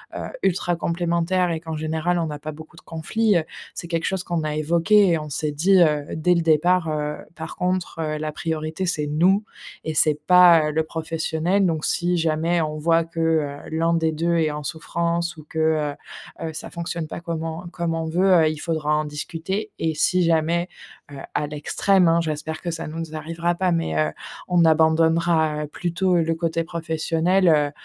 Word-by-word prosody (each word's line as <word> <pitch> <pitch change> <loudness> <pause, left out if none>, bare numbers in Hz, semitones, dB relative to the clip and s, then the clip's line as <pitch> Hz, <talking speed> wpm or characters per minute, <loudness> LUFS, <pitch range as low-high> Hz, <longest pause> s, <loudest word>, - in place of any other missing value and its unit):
heu, - - -4 0.2
ultra 175 -1 +1
complémentaires 170 +1 0
et 160 - -2
qu'en 160 -1 -5
général, 160 +3 -1
on 165 -2 -1
a 145 - -5
pas 155 +1 -6
beaucoup 160 +2 -13
de - - -13
conflits, 195 +5 0
heu, 160 - 0 0.3
c'est 170 - -7
quelque 165 -1 -1
chose 190 -1 -1
qu'on 170 -2 -2
a 150 0 -2
évoqué 170 +6 +3
et 165 -2 +2
on 150 0 -7
s'est 150 +1 -2
dit, 180 +5 +4
heu, 150 -3 +3
dès 175 +3 +2
le 170 - +2
départ, 165 +2 +3
heu: 150 -1 -2 0.2
«Par 160 0 -7
contre, 180 -2 -2
heu, 155 -1 -2
la 155 0 -3
priorité, 160 +3 -3
c'est 150 -4 -1
nous 180 +8 +3 0.4
et 160 - -3
c'est 150 -1 +3
pas 175 -4 +7
le 160 +1 +1
professionnel», 165 +4 -1
donc 160 -3 0
si 175 0 +1
jamais 165 +1 +1
on 155 -1 -3
voit 165 +2 +2
que, 165 0 -8
heu, 155 -3 +1
l'un 165 +1 +1
des 160 -1 +1
2 170 +2 0
est 155 -2 +1
en 150 0 -5
souffrance 170 +2 -2
ou 155 - -12
que 160 - -8 0.8
heu, - - -4
heu, 160 - -6
ça - - -7
fonctionne 170 -2 -4
pas - - -6
comme 165 -1 -4
on 165 +2 -5
comme 170 -2 -2
on 165 - -2
veut, 185 +3 +3
heu, - - +3
il 155 - -4
faudra 155 -2 -1
en 155 - 0
discuter 170 +8 -4
et 160 -1 -1
si 180 +3 +3
jamais, 170 +2 +1 0.4
heu, 140 - -9 0.2
à 150 - 0
l'extrême, 175 +5 +2
hein, 165 +1 +3
j'espère 155 0 -4
que 175 - -3
ça 165 - -5
nous 160 +2 -6
n 165 - -3
z 155 - -14
arrivera 165 +2 -2
pas, 185 0 +1
mais 120 - -1
heu, 75 0 +1 0.4
on 175 -2 +3
abandonnera, 160 0 +3
heu, - - -5
plutôt 175 +3 0
le 165 -1 +1
côté 165 0 -1
professionnel, 165 +2 0
heu, 150 -2 +3
165 Hz, 205 wpm, -23 LUFS, 155-175 Hz, 0.8 s, pas